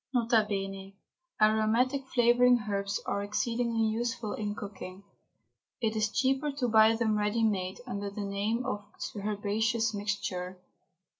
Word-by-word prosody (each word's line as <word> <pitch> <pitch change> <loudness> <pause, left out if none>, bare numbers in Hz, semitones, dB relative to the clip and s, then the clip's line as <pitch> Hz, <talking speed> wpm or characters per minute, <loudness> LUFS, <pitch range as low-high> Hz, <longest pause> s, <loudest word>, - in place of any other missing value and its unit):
N.B. 195 -4 0 0.4
Aromatic 225 +5 +2
flavouring 245 0 +4
herbs 200 0 -1
are 200 - -1
exceedingly 230 +2 0
useful 230 0 -2
in 210 -1 -3
cooking. 200 -2 -8 0.8
It 225 -2 0
is 215 -1 +1
cheaper 270 +5 +1
to 265 -3 -1
buy 220 0 +5
them 220 -2 +1
ready 210 +2 +1
made, 195 -1 -1
under 200 -5 -4
the 200 +1 -6
name 205 +5 -1
of 205 - -3 0.3
Herbaceous 215 +2 0
Mixture. 200 -3 -3
215 Hz, 125 wpm, -30 LUFS, 200-235 Hz, 0.8 s, buy